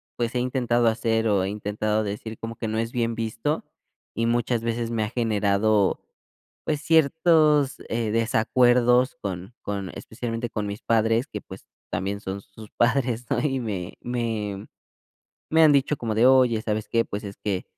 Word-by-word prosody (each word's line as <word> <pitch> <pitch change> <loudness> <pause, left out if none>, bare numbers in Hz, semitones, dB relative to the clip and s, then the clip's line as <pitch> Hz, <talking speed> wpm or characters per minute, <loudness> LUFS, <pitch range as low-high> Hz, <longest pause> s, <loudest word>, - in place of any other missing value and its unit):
pues, 120 0 -2
he 125 - 0
intentado 120 -2 +1
hacer 115 0 +1
o 100 -3 +2
he 95 - -1
intentado 105 +1 -1
decir 105 +2 -5
como 115 0 -6
que 115 - -4
no 110 +1 -1
es 115 +1 -2
bien 115 -1 0
visto, 115 +7 -2 0.5
y 115 - 0
muchas 120 0 0
veces 115 0 -2
me 115 -2 -1
ha 105 - -3
generado, 105 -3 +1 0.7
pues 150 -1 -1
ciertos 155 -2 +3
eh, 115 -1 -1
desacuerdos 120 +3 +3
con 95 +2 -5
con 100 -2 -4
especialmente 115 +1 -5
con 105 -2 -3
mis 100 +1 -6
padres 115 +3 +2
que, 105 - -6
pues, 95 - -12 0.2
también 100 +1 -2
son 95 0 -5
sus 105 +2 -14
padres, 120 -1 +1
¿no? - - +1
Y 135 -3 0
me 100 -7 -4
me 110 -5 -3 0.8
me 160 0 +5
han 155 -2 +7
dicho 140 +1 +2
como 115 -2 -2
de: 115 +3 +4
"Oye, 130 -4 +5
¿sabes 110 -1 -2
qué? 115 0 +2
Pues 105 +1 -5
es 100 -1 -7
que, 95 -3 -2
115 Hz, 170 wpm, -25 LUFS, 105-125 Hz, 0.8 s, han